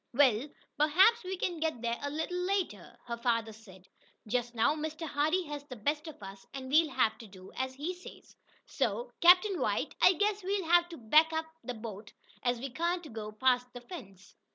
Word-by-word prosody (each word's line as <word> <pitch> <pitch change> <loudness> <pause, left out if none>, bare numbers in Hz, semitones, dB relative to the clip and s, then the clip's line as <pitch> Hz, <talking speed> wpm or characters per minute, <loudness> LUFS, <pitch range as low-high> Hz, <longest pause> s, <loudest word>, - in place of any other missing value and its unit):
"Well, 265 -1 +4 0.3
perhaps 375 +10 +5
we 375 +1 -4
can 350 -2 -2
get 315 -7 -2
there 235 0 -1
a 285 - -2
little 320 +5 -3
later," 360 - -2
her 235 -1 -4
father 230 -2 0
said. 190 -4 -16 0.4
"Just 240 +2 -2
now 225 +5 +3
Mr. 315 +1 -4
Hardee 310 +6 +1
has 295 -1 -6
the 255 - -8
best 295 +8 -2
of 295 -9 -10
us, 195 0 -9
and 260 -1 -6
we'll 315 +1 +5
have 255 -5 +1
to 225 - -10
do 190 -1 -13
as 260 0 -3
he 305 +7 -3
says. 360 0 -14 0.3
So, 485 - -2
Captain 365 +2 +6
White, - - 0
I 365 - +7
guess 410 +3 0
we'll 390 -1 -1
have 345 +1 +4
to 335 - -8
back 305 +8 +4
up 320 0 -1 0.2
the 250 - -5
boat, 215 -2 -8 0.3
as 245 0 +1
we 270 +1 -5
can't 340 0 -2
go 215 -1 -6
past 250 +2 +1
the 245 - -8
fence." 205 - -11
285 Hz, 200 wpm, -31 LUFS, 230-340 Hz, 0.4 s, I